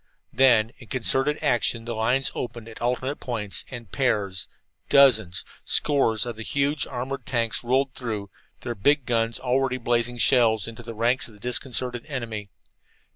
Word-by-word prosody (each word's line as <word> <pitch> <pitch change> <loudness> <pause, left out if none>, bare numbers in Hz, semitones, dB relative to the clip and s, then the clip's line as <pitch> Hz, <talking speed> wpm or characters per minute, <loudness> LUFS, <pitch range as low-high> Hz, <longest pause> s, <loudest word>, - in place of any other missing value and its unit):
Then, 120 -4 +4
in 120 - -13
concerted 135 +4 +1
action, 120 -4 +1
the 120 - -3
lines 125 +5 +1
opened 120 -2 -6
at 110 - -11
alternate 125 +4 -1
points, 110 -5 -3
and 120 -7 -9
pairs, 105 -8 0 0.4
dozens, 110 -11 +4 0.2
scores 125 -8 +2
of 120 -2 -5
the - - -7
huge 140 +4 0
armored 130 +3 -5
tanks 115 -3 0
rolled 130 +2 +1
through, 110 -6 -5 0.3
their 120 - -3
big 140 +6 +2
guns 115 -2 0
already 130 0 0
blazing 120 0 0
shells 115 -4 +4
into 115 0 -8
the 115 0 -8
ranks 120 +4 +1
of 110 - -15
the - - -18
disconcerted 125 +1 0
enemy. 115 -7 -5
120 Hz, 155 wpm, -25 LUFS, 115-130 Hz, 0.4 s, Then